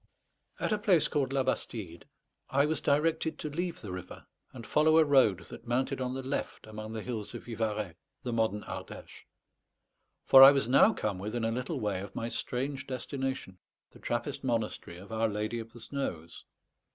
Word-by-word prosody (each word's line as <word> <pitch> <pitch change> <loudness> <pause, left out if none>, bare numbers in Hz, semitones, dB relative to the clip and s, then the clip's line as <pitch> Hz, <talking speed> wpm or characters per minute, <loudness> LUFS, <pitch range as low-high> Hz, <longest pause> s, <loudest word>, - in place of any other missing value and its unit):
At - - -1
a 210 - +1
place 190 -7 +4
called 135 -3 0
La 135 -1 +1
Bastide 105 -9 -4 0.4
I 140 +2 +3
was 155 +1 -1
directed 160 +2 +1
to 150 - -5
leave 175 +3 -3
the 105 -6 -7
river, 90 -1 -8 0.3
and 120 -4 -9
follow 155 +5 +4
a 160 - +6
road 130 -10 +4
that - - -10
mounted 130 +2 0
on 125 0 -2
the 135 - -4
left 135 +2 -4
among 110 0 -7
the 110 -1 -4
hills 110 -5 -5
of - - -7
Vivarais, 110 -5 -2 0.3
the 120 - -3
modern 110 -2 0
Ardèche; - - -9 1.0
for 135 - +9
I 135 +1 +12
was 135 -4 +1
now 135 - +6
come 105 - -3
within 110 +4 -3
a 115 - +1
little 125 +2 -3
way 100 -3 -1
of 100 - -9
my 115 - -3
strange 130 +3 -3
destination, 130 -6 -4 0.3
the - - -16
Trappist 120 +5 -3
monastery 115 -8 -2
of 100 +4 -12
Our 110 0 +1
Lady 105 +2 -2
of 115 0 -8
the 120 - -13
Snows. 85 - -5
120 Hz, 185 wpm, -30 LUFS, 110-140 Hz, 1.0 s, I